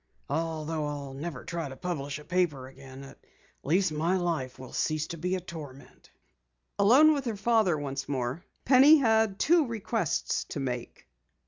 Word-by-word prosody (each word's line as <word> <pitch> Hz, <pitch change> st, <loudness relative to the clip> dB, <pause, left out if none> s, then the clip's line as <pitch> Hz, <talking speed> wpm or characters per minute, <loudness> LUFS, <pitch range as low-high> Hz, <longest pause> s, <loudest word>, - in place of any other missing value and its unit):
Although 160 Hz, 0 st, -2 dB
I'll 140 Hz, -2 st, -6 dB
never 145 Hz, -1 st, -6 dB
try 170 Hz, -4 st, -4 dB
to 135 Hz, -, -9 dB
publish 145 Hz, -5 st, -4 dB
a 150 Hz, -, -12 dB
paper 170 Hz, -8 st, 0 dB
again, 135 Hz, 0 st, -12 dB
at 135 Hz, -, -13 dB, 0.4 s
least 180 Hz, +4 st, +1 dB
my 165 Hz, +5 st, 0 dB
life 165 Hz, -8 st, -2 dB
will 130 Hz, -1 st, -11 dB
cease 155 Hz, -1 st, -1 dB
to 170 Hz, -, -7 dB
be 180 Hz, +3 st, -1 dB
a -, -, -2 dB
torment." 155 Hz, -7 st, -11 dB, 0.7 s
Alone 270 Hz, +10 st, +6 dB
with 280 Hz, -2 st, -3 dB
her 225 Hz, -4 st, -3 dB
father 210 Hz, -5 st, +2 dB
once 140 Hz, -1 st, -5 dB
more, 130 Hz, +4 st, -3 dB, 0.2 s
Penny 275 Hz, +4 st, +7 dB
had 220 Hz, -6 st, +2 dB
two 320 Hz, +2 st, +3 dB
requests 225 Hz, -5 st, -2 dB
to -, -, -6 dB
make. 125 Hz, -, -5 dB
165 Hz, 160 wpm, -28 LUFS, 140-200 Hz, 0.7 s, Penny